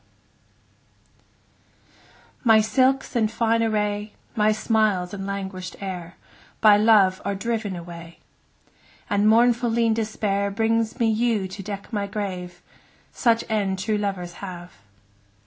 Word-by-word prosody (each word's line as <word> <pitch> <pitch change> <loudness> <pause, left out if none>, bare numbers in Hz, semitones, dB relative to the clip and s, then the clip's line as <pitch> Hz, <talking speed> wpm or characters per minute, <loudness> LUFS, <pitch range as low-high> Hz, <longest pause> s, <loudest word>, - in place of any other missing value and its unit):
Song - - -34
MY 225 -3 +6
silks 260 +4 +1
and 220 -2 +1
fine 230 -1 +1
array, 210 -1 -1 0.2
My 215 0 +3
smiles 215 -4 +1
and 195 -1 -5
languish'd 190 -2 -5
air, 180 -3 -6 0.4
By 215 -2 +7
Love 205 -3 +4
are 200 - -2
driven 220 -2 -3
away; 170 -1 -10 0.9
And 205 +1 +3
mournful 235 +1 +4
lean 230 0 +2
Despair 210 -2 -1
Brings 225 +3 0
me 230 - +3
yew 220 -3 +1
to 190 +2 -8
deck 200 +3 -7
my 205 -1 -1
grave: 185 -3 -5 0.5
5 - - -32
Such 230 -2 +2
end 200 -3 0
true 210 +2 -1
lovers 190 -4 -3
have. 180 -2 -8
210 Hz, 130 wpm, -24 LUFS, 190-225 Hz, 0.9 s, By